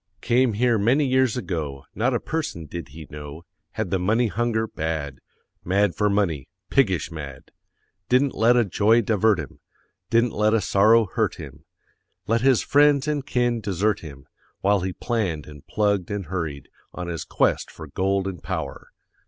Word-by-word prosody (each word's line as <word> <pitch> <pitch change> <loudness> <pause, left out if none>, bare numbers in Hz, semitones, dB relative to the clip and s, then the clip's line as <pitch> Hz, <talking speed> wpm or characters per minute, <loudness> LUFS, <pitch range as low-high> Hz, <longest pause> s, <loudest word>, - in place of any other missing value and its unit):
Came 125 -1 +2
here 120 +1 +2
many 130 +8 +3
years 130 -2 +2
ago, 80 - -4
Not 120 +6 +1
a - - +1
person 155 - -4
did 85 +3 -7
he 75 +3 -11
know; 75 +2 -9 0.3
Had 110 -5 -3
the 95 - +1
money 110 +6 +2
hunger 110 +1 0
bad 80 -7 -4 0.4
Mad 100 +1 +2
for 105 -1 +1
money, 95 -9 0 0.2
piggish 95 - +2
mad; 70 -5 -9 0.6
Didn't 130 +2 +3
let 120 +2 +4
a 120 - +4
joy 105 +5 +3
divert 110 -1 +2
him, 75 -4 -7 0.5
Didn't 115 +1 +2
let 105 +1 +2
a - - +3
sorrow 110 +3 +4
hurt 95 - -1
him, 75 +2 -11 0.6
Let 115 +1 +1
his 130 -2 +4
friends 145 -1 +4
and 150 -2 -1
kin 120 -3 0
desert 105 +1 0
him, 70 -4 -11 0.4
While 100 +1 +3
he 95 +1 -2
planned 95 -12 -2
and 75 0 -13
plugged 100 -4 0
and 100 -2 -3
hurried 80 -5 -4 0.3
On 90 -1 -5
his 85 -2 -4
quest - - 0
for 80 - -10
gold 95 +6 -1
and 90 -5 -6
power. - - -5
100 Hz, 170 wpm, -24 LUFS, 85-115 Hz, 0.6 s, let